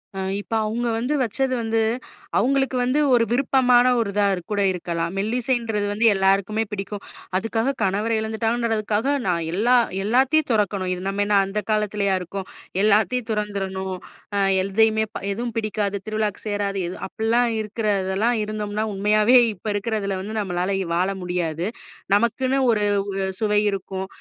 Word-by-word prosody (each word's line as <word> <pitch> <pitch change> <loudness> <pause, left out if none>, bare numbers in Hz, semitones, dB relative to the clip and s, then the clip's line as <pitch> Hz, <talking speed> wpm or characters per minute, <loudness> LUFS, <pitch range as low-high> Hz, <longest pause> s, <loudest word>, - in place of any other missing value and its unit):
அ - - -4 0.2
இப்ப 225 - -8
அவுங்க 235 +3 -1
வந்து 250 +6 -1
வச்சது 255 +3 0
வந்து 225 0 0 0.6
அவுங்களுக்கு 270 0 +2
வந்து 255 +4 +1
ஒரு 235 -1 +5
விருப்பமான 250 -1 +4
ஒருதாக்கூட 200 -1 0
இருக்கலாம். 170 -1 -3
மெல்லிசைன்றது 225 -1 -1
வந்து 220 +3 0
எல்லாருக்குமே 195 +3 +2
பிடிக்கும். 200 0 -5 0.4
அதுக்காகக் 225 +6 -1
கணவரை 210 +4 +1
இழந்துட்டாங்கன்றதுக்காக 225 +2 0
நான் 170 -2 +1
எல்லா 235 +6 +3 0.3
எல்லாத்தையும் 265 +8 +3
துறக்கணும். 200 -4 0
இது 180 - -5
நம்ம 200 +1 -1
என்ன 205 0 +2
அந்தக் 210 +3 -4
காலத்துலயா 210 -2 +1
இருக்கோம்? 190 +2 -6 0.3
எல்லாத்தையும் 220 +3 +2
துறந்திறணும். 195 -3 -3 0.4
அ - - +1 0.2
எதையுமே 220 +3 +2 0.3
எதுவும் 235 +2 -3
பிடிக்காது. 210 -2 -1
திருவிழாவுக்குச் 215 -1 -2
சேராது. 205 -1 -1
எது? 185 - -6
அப்புட்ல்லாம் 230 +3 +1
இருக்குறதெல்லாம் 210 +1 0
இருந்தோம்ன்னா, 210 0 -3
உண்மையாவே 210 +4 +3 0.2
இப்ப 205 +3 -11
இருக்குறதுல 200 -2 -2
வந்து 215 +3 -6
நம்மளால 180 -3 -1 0.3
வாழ 185 +3 +1
முடியாது. 175 -1 -2 0.5
நமக்குன்னு 255 +5 +1
ஒரு 210 -2 +1 0.3
உ - - -2 0.2
அ - - -2
சுவை 210 -1 +3
இருக்கும். 190 -1 -4
210 Hz, 135 wpm, -23 LUFS, 195-230 Hz, 0.6 s, ஒரு